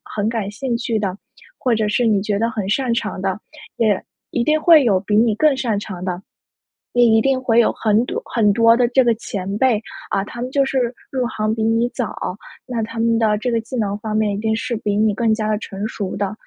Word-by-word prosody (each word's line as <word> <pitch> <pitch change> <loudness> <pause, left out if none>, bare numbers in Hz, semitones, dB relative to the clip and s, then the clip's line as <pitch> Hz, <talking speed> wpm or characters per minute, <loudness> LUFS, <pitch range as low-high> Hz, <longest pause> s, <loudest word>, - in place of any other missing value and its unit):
很 210 0 0
感 220 -4 -2
兴 240 +3 -3
趣 230 -1 -1
的， 195 -2 -2 0.4
或 250 -4 +1
者 215 -1 0
是 240 +3 +1
你 210 -3 +3
觉 205 -1 -1
得 230 +1 +1
很 210 -4 -4
擅 245 +1 +1
长 210 -5 -3
的， 190 0 -1 0.4
也 215 -5 +1 0.3
一 240 - 0
定 310 0 +3
会 320 -5 +7
有 200 -5 +4
比 205 +1 -1
你 225 -2 +3
更 300 +3 +3
擅 230 -5 0
长 190 -3 -6
的。 180 0 -3 0.7
你 235 -2 +5
一 - - +4
定 270 +1 +1
会 235 -2 +3
有 - - +2
很 220 +2 +1
多 - - -4
很 215 -3 +4
多 230 +1 +5
的 245 -1 +3
这 260 +2 +4
个 240 -1 +3
前 200 -2 -5
辈 235 -4 +2 0.3
啊， 195 - 0
他 240 +3 -8
们 250 - -3
就 275 0 +3
是 270 - -2 0.3
入 260 -2 -1
行 215 -2 -1
比 220 - -2
你 225 +2 +2
早， 245 -2 -4 0.5
那 240 -3 -3
他 230 +1 -7
们 230 0 +2
的 215 -2 +2
这 245 +3 -2
个 230 - +1
技 250 +3 -6
能 205 -3 -1
方 215 0 -4
面 215 -1 +1
一 - - -3
定 220 +1 0
是 235 +1 -3
比 205 -1 -2
你 215 0 +3
更 225 +1 +1
加 215 -1 -1
地 210 - +1
成 200 -1 -6
熟 200 -4 -4
的。 200 +1 -2
225 Hz, 260 characters per minute, -20 LUFS, 210-240 Hz, 0.7 s, 会